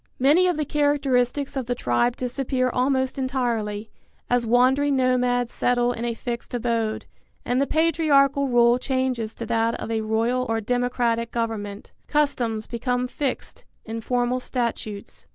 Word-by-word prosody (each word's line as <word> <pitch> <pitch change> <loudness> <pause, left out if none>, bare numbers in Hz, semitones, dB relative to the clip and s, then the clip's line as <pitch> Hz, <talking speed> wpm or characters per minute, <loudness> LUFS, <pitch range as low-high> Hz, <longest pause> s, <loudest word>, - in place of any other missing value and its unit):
Many 300 +8 +4
of 355 -3 0
the 305 - -1
characteristics 285 -2 +1
of 260 -3 -3
the 245 - 0
tribe 230 - +1
disappear 255 0 -1
almost 260 +1 0
entirely, 230 -5 -2 0.4
as 245 -1 +2
wandering 265 +4 +3
nomads 250 -2 +1
settle 245 0 +1
in 235 -1 -4
a 235 -1 -2
fixed 240 +1 -5
abode, 230 -2 -1 0.4
and 250 +2 +1
the 280 - +1
patriarchal 290 -4 +3
rule 240 -1 +4
changes 255 -4 -1
to 230 - -5
that 230 +1 0
of - - -5
a 220 -1 0
royal 230 +4 0
or 225 0 +1
democratic 240 0 0
government. 215 -4 -4 0.2
Customs 245 -7 0
become 250 +1 -1
fixed 260 +1 -4 0.2
in 225 0 -5
formal 245 +1 0
statutes. 235 -5 -4
245 Hz, 145 wpm, -24 LUFS, 230-265 Hz, 0.4 s, Many